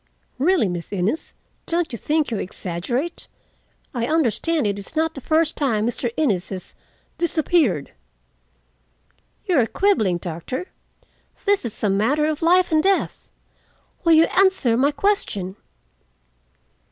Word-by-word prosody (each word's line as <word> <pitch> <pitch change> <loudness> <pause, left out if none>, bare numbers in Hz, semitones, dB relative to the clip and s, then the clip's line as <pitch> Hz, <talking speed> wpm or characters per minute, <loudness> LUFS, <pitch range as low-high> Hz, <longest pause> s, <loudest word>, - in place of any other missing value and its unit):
"Really, 330 - +3
Miss 175 -2 -5
Innes, 200 - -2 0.3
don't 340 0 0
you - - -3
think 305 -3 0
you 225 - -1
exaggerate? 200 - -4 0.7
I 235 -2 -1
understand 315 - +1
it 200 -1 -1
is 200 - -6
not 320 +1 +1
the 275 - -8
first 315 +3 +1
time 225 -7 0
Mr. 240 0 -2
Innes 205 - +1
has—disappeared." 280 - -2 1.5
"You 350 -6 +3
are 230 - +3
quibbling, 225 - +2
doctor. 175 - -5 0.8
This 400 -7 +2
is 225 - -4
a 210 - +3
matter 260 +10 +2
of 310 0 -2
life 355 +2 +4
and 310 -1 +4
death. 390 +2 0 0.7
Will 335 -1 +5
you 320 0 +7
answer 375 -11 +3
my 270 +4 +3
question?" 285 - -1
280 Hz, 130 wpm, -22 LUFS, 205-330 Hz, 1.5 s, you